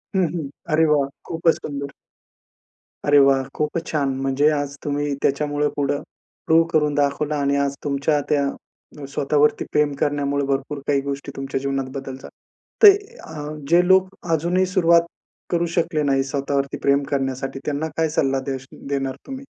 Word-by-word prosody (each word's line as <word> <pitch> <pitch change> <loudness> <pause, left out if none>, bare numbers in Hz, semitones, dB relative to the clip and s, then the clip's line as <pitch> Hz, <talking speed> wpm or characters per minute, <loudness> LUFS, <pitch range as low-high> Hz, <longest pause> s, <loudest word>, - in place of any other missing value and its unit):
हं, 190 - +3
हं. 155 -6 -4 0.2
अरे 160 +1 +4
वाह! 145 -3 +3 0.2
खूपच 165 0 +2
सुंदर. 140 -1 -6 1.1
अरे 145 0 +5
वाह! 135 -1 +4
खूपच 155 +2 -2
छान 145 -3 0
म्हणजे 135 +3 +2
आज 145 -1 -2
तुम्ही 145 0 -1
त्याच्यामुळं 145 +1 +1
पुढं 145 0 0 0.4
प्रूव्ह 165 +1 +5
करून 150 -2 +2
दाखवलं 145 +1 0
आणि 140 -1 +1
आज 140 0 -2
तुमच्या 145 +1 +1
त्या 145 -1 +2 0.6
अ, 140 - -5
स्वतःवरती 145 +1 +1
प्रेम 150 -1 +2
करण्यामुळे 145 -1 0
भरपूर 140 +1 -2
काही 140 -1 +2
गोष्टी 140 0 -5
तुमच्या 135 0 -3
जीवनात 135 -1 -2
बदल 135 -1 -7
झा - - -9 0.6
ते 410 - +12 0.3
अ, 160 - -11 0.4
जे 175 +1 +5
लोक 190 0 +5 0.2
अजूनही 175 +4 +2
सुरुवात 170 -2 +5 0.5
करू 170 -1 +2
शकले 165 -3 +1
नाही 135 -1 +2
स्वतःवरती 140 0 -2
प्रेम 140 0 +3
करण्यासाठी, 135 0 -2
त्यांना 150 +2 -1
काय 160 -1 +2
सल्ला 135 -3 +1
देश 135 -1 -4 0.2
देणार 135 -1 -2
तुम्ही? 270 0 -7
145 Hz, 155 wpm, -22 LUFS, 140-155 Hz, 1.1 s, ते